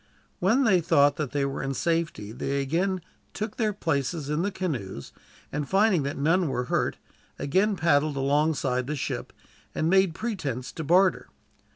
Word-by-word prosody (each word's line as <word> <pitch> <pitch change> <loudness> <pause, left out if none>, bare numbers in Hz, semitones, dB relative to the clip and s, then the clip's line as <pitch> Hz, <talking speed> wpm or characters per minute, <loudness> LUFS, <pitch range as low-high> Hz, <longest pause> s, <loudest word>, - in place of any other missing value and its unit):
When 225 +9 +3
they 190 -7 +4
thought 145 -3 +4
that 150 -4 -2
they 140 +2 0
were 135 - -3
in 135 0 -3
safety 165 -10 -1
they 135 +4 -2
again 175 +7 0 0.3
took 215 +2 -4
their 220 -3 +1
places 150 -5 -2
in 150 +2 0
the 200 - 0
canoes, 125 - -4 0.4
and 145 -1 -3
finding 195 -3 +3
that 140 +1 -3
none 165 +5 +2
were 125 -1 -1
hurt, - - +1 0.4
again 195 +8 +1
paddled 155 -3 +2
alongside 135 -2 +1
the 150 - -2
ship, 135 - -4 0.4
and 160 +2 +1
made 190 -3 +4
pretense 145 - -3
to 160 - -6
barter. 180 +4 +3
155 Hz, 165 wpm, -26 LUFS, 140-185 Hz, 0.4 s, they